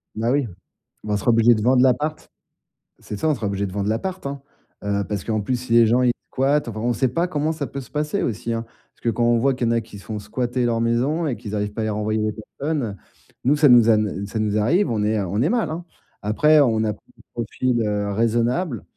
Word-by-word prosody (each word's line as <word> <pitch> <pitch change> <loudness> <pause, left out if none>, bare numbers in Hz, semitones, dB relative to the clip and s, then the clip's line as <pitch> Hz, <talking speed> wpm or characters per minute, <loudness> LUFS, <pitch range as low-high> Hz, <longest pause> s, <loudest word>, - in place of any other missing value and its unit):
Bah 115 +3 0
oui. 140 -2 +2 0.6
Bah 105 - -2
on 105 - +2
sera 105 - -1
obligé 115 +1 +5
de 110 - -2
vendre 125 +3 +4
l'appart. 145 +5 0 0.7
C'est 105 - -7
ça, 160 - 0
on 150 - +2
sera 115 -4 -3
obligé 100 0 -1
de 95 - -5
vendre 100 +1 -2
l'appart 185 +11 -3
hein, 140 0 -4 0.4
heu, 100 0 0
parce 105 -2 -3
qu'en 110 -1 -1
plus, 125 +5 -1
si 120 -1 -3
les 115 0 +7
gens, 120 +3 +3
ils 125 - +4 0.2
squattent. 140 +2 +1
Enfin 110 -2 -5
on 120 - +1
sait 130 - +1
pas 170 +9 0
comment 155 -1 -1
ça 150 -3 -4
peut 140 - -6
se 125 - -14
passer 150 +6 -1
aussi 115 +1 -2
hein. 115 - -2 0.3
Parce - - -33
que 120 - +1
quand 120 +2 0
on 120 0 +4
voit 135 +3 +2
qu'il 125 -2 -1
y - - +2
en - - +2
a 115 - +2
qui 110 -2 -12
se - - -15
font 110 -1 -4
squatter 120 +4 -2
leur 115 -1 +1
maison 130 +8 +1
et 125 - -2
qu'ils 105 0 -6
arrivent 105 0 -2
pas 110 - -3
à - - -1
les - - -1
renvoyer 105 +1 -1
les 105 0 -1 0.3
personnes. 140 -9 -2 0.5
Nous, 140 +4 +4
ça 145 -1 +5
nous 120 -2 +7
ane 105 -3 +1
ça 110 - -5
nous 105 -1 0
arrive, 165 - +2
on 110 -2 0
est, 110 +1 +1
heu, 100 - -1
on 100 +5 -1
est 150 - +2
mal 235 -1 0
hein. 165 +2 -5 0.4
Après, 150 +9 +4
on 110 -5 +3
a 110 - +1
pris - - -21
un - - -18
profil, 120 +1 -1
heu, 105 -1 -1
raisonnable, 115 - 0
115 Hz, 265 wpm, -22 LUFS, 105-140 Hz, 0.7 s, les